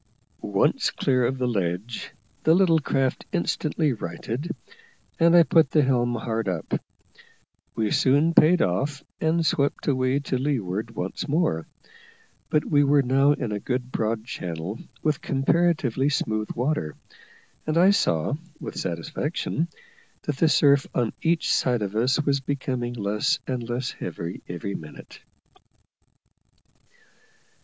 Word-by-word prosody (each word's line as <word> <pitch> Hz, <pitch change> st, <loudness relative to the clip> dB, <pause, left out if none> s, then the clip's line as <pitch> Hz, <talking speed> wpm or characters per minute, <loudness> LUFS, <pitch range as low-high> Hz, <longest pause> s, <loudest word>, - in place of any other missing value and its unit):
Once -, -, +1 dB
clear 130 Hz, -2 st, +1 dB
of 130 Hz, +2 st, -2 dB
the 125 Hz, -1 st, 0 dB
ledge, 100 Hz, +1 st, -2 dB, 0.3 s
the 160 Hz, -, +4 dB
little 175 Hz, -4 st, +4 dB
craft 135 Hz, -2 st, 0 dB
instantly 155 Hz, -4 st, 0 dB
righted, 115 Hz, -, -5 dB, 0.7 s
and 170 Hz, +1 st, +5 dB
I 170 Hz, -, +8 dB
put 160 Hz, -3 st, +4 dB
the 150 Hz, +1 st, +3 dB
helm 120 Hz, -2 st, +1 dB
hard 115 Hz, -2 st, -2 dB
up. 85 Hz, -4 st, -4 dB, 1.0 s
We 110 Hz, -2 st, 0 dB
soon 145 Hz, +5 st, +3 dB
paid 170 Hz, +2 st, +5 dB
off, 135 Hz, +12 st, -1 dB, 0.2 s
and 160 Hz, +1 st, +1 dB
swept 140 Hz, -2 st, 0 dB
away 130 Hz, -1 st, +2 dB
to 130 Hz, -2 st, -2 dB
leeward 115 Hz, -5 st, -2 dB
once 95 Hz, -, -4 dB
more; 145 Hz, -, 0 dB, 0.8 s
but 150 Hz, -, +1 dB
we 145 Hz, -1 st, +3 dB
were 140 Hz, 0 st, +4 dB
now 135 Hz, +3 st, +4 dB
in 125 Hz, -6 st, -3 dB
a 105 Hz, -, -2 dB
good 125 Hz, +2 st, -3 dB
broad 110 Hz, -1 st, -1 dB
channel, 90 Hz, -1 st, -5 dB, 0.2 s
with 150 Hz, -3 st, 0 dB
comparatively 140 Hz, -2 st, +1 dB
smooth 110 Hz, -6 st, -1 dB
water, 120 Hz, -, -1 dB, 0.7 s
and 155 Hz, +1 st, 0 dB
I 185 Hz, +3 st, +6 dB
saw, 85 Hz, -, +1 dB, 0.3 s
with -, -, -6 dB
satisfaction, 145 Hz, -, -2 dB, 0.6 s
that 145 Hz, -3 st, -3 dB
the 165 Hz, -, +3 dB
surf 140 Hz, -1 st, +4 dB
on 120 Hz, -3 st, 0 dB
each 165 Hz, 0 st, +1 dB
side 120 Hz, -4 st, +1 dB
of 100 Hz, +1 st, -4 dB
us 125 Hz, +6 st, +2 dB
was 140 Hz, -2 st, +1 dB
becoming 130 Hz, -3 st, -3 dB
less 105 Hz, +8 st, 0 dB
and 130 Hz, -2 st, -2 dB
less 120 Hz, +2 st, -3 dB
heavy 85 Hz, 0 st, -6 dB
every 90 Hz, +3 st, -4 dB
minute. 75 Hz, -4 st, -10 dB
130 Hz, 135 wpm, -25 LUFS, 110-150 Hz, 1.0 s, I